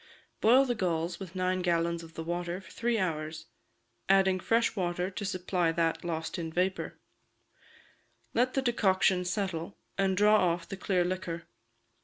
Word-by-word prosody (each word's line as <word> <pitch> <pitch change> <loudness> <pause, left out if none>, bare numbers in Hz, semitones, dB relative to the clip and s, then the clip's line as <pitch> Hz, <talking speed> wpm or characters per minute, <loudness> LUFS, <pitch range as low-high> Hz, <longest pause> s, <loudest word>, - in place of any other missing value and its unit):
Boil 255 +5 +6
the 245 - 0
galls 170 -4 -1
with 190 -2 -8
nine 185 0 0
gallons 170 -1 +1
of 165 -1 -13
the 165 - -4
water 175 +1 -3
for 190 - -15
three 235 0 0
hours, 155 -4 -2 0.6
adding 190 -1 +4
fresh 230 +5 +1
water 180 -1 -1
to 200 - -5
supply 185 -3 0
that 165 0 0
lost 165 0 -3
in 165 -1 -4
vapour; 185 +3 -1 1.4
let 250 +2 +2
the 270 - +1
decoction 190 -6 +3
settle, 180 -2 -3 0.2
and 190 -1 +2
draw 210 +1 +6 0.2
off 170 0 -7
the 195 - -5
clear 185 -2 +1
liquor. 175 -2 -3
185 Hz, 155 wpm, -30 LUFS, 170-195 Hz, 1.4 s, Boil